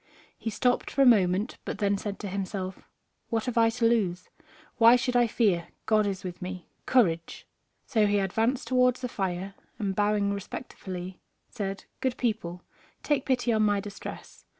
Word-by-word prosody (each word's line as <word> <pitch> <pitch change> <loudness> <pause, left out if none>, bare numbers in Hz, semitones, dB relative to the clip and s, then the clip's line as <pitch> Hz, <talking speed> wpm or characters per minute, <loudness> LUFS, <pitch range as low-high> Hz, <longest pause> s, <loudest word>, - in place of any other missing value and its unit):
He 225 - -4
stopped 245 +4 +1
for 275 - +3
a - - +5
moment, 200 -2 +3
but - - -4
then 200 -1 +1
said 200 0 -4
to 205 - -4
himself, 190 -1 -4 0.4
"What 225 -1 -1
have 250 -2 -2
I 230 -1 +5
to 230 +1 -1
lose? 195 -6 +1 0.5
Why 230 +1 +8
should 250 0 0
I 240 -1 +5
fear? 195 -7 +1 0.2
God 215 -1 +3
is 195 -2 -3
with 180 -1 -6
me. 180 0 -6 0.2
Courage!" 170 -10 +1 0.4
So 215 -3 +2
he 205 0 +2
advanced 220 +6 0
towards 250 -1 +3
the 250 - -1
fire, 190 -3 -3 0.2
and 200 -4 -2
bowing 205 0 +2
respectfully, 185 -3 -7 0.3
said: 195 -4 -4
"Good 260 -2 -1
people, 195 -7 -2 0.4
take 290 -3 0
pity 245 -3 +2
on 215 - +2
my 205 -1 +3
distress. 205 0 -9
210 Hz, 170 wpm, -28 LUFS, 190-235 Hz, 0.5 s, Why